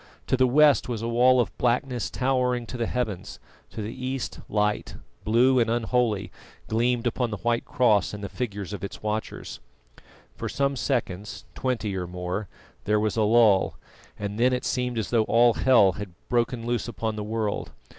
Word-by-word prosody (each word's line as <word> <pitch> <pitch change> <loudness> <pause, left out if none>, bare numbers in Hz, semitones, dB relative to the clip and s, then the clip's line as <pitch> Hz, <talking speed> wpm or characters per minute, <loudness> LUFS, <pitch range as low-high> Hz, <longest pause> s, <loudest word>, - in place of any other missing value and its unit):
To - - +1
the 130 0 +3
west 145 +1 +4
was 115 -2 -3
a - - -1
wall 125 +2 +4
of 120 - 0
blackness 125 -1 0
towering 125 -2 0
to 125 - -8
the 115 -2 -1
heavens; 110 -7 -3 0.3
to 110 - -6
the 110 +3 -5
east, 130 0 -4
light, 105 0 0 0.3
blue 125 +4 +4
and 115 -2 +2
unholy, 115 -3 0 0.4
gleamed 120 +2 +1
upon 120 0 0
the 105 - -4
white 115 +3 0
cross 120 -7 +2
and 105 -1 -7
the - - -2
figures 100 -1 -5
of 100 - -6
its 100 - -7
watchers. 110 +1 -4 0.8
For - - -4
some 140 0 0
seconds 105 -7 -3
twenty 115 -6 -2
or 90 -2 -3
more 90 +3 -4 0.4
there 105 0 +2
was 110 -1 0
a 110 - +1
lull, 110 -3 +4 0.4
and 105 +1 -4
then 125 +2 +4
it 125 - -2
seemed 125 -1 -1
as 110 - -2
though 115 -2 +3
all 120 +1 +4
hell 120 -8 +5
had 100 0 -7 0.2
broken 120 -1 0
loose 120 0 -1
upon 110 -2 -3
the 105 - -4
world. 110 -1 -2
115 Hz, 180 wpm, -26 LUFS, 105-125 Hz, 0.8 s, hell